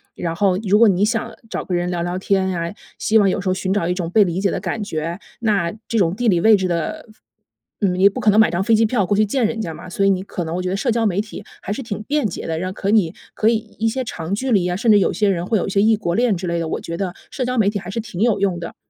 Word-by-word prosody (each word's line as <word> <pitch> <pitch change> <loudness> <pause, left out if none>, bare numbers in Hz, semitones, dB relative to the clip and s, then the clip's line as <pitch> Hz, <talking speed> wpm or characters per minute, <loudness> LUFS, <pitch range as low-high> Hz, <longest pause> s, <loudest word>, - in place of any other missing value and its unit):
然 165 -1 -3
后， 195 -2 +2
如 205 - +5
果 230 0 +6
你 195 0 +2
想 225 +1 -2 0.2
找 - - -3
个 180 - -4
人 175 0 0
聊 175 -1 -2
聊 175 +1 -2
天 190 -1 +1
啊， 170 +1 -3 0.3
希 220 - +3
望 200 -2 +4
有 200 - -1
时 190 - -5
候 - - +2
寻 190 0 -1
找 170 -5 0
一 180 - +1
种 175 -3 -3
被 210 +1 +6
理 175 -1 -2
解 195 0 +1
的 - - -2
感 220 - -3
觉。 165 -2 -3 0.2
那 200 -7 +1 0.2
这 230 - -1
种 180 -3 +2
地 240 +2 -1
理 175 -5 +3
位 220 +2 +6
置 190 -1 -1
的 170 - -3 0.8
嗯， 185 -3 +2
你 195 +2 +6
不 195 - -6
可 210 - +3
能 210 - +4
买 220 - +5
张 175 +2 0
飞 225 +3 +3
机 225 +1 +4
票 215 -4 +1
过 205 - +1
去 215 +1 +3
见 235 +2 +1
人 225 0 -3
家 165 -5 -4
嘛， - - -10
所 195 +2 0
以 - - +5
你 190 -1 +1
可 190 -2 -5
能 160 - -4
我 180 - -2
觉 180 - -2
得 190 - -1
社 235 +5 0
交 230 0 +1
媒 200 -1 +1
体 215 - -9 0.2
还 - - -5
是 210 - -3
挺 215 -3 -5
便 290 +1 0
捷 180 - -6
的。 160 0 -2
让 185 +2 -3
可 195 - -3
你 200 -7 +3 0.2
可 215 - 0
以 230 - +4 0.2
一 225 - +1
些 260 +3 -1
长 180 -4 -4
距 260 +4 -2
离 190 -5 +3
啊， 180 - -1
甚 220 +4 +2
至 205 - +6
有 - - +1
些 210 -2 +1
人 175 -2 -1
会 220 +3 +1
有 - - -1
一 - - -2
些 200 +1 +2
异 220 +1 +4
国 190 -5 -2
恋 235 -3 +2
之 180 +1 -5
类 170 0 -1
的， 165 - -2
我 - - -3
觉 170 - -5
得 185 -1 -3 0.2
社 255 - -2
交 250 0 -2
媒 205 -3 +4
体 205 -1 -3
还 180 - -9
是 225 +4 -3
挺 215 -5 -8
有 225 -3 +2
用 190 -3 +1
的。 170 - -7
195 Hz, 345 characters per minute, -20 LUFS, 180-220 Hz, 0.8 s, 果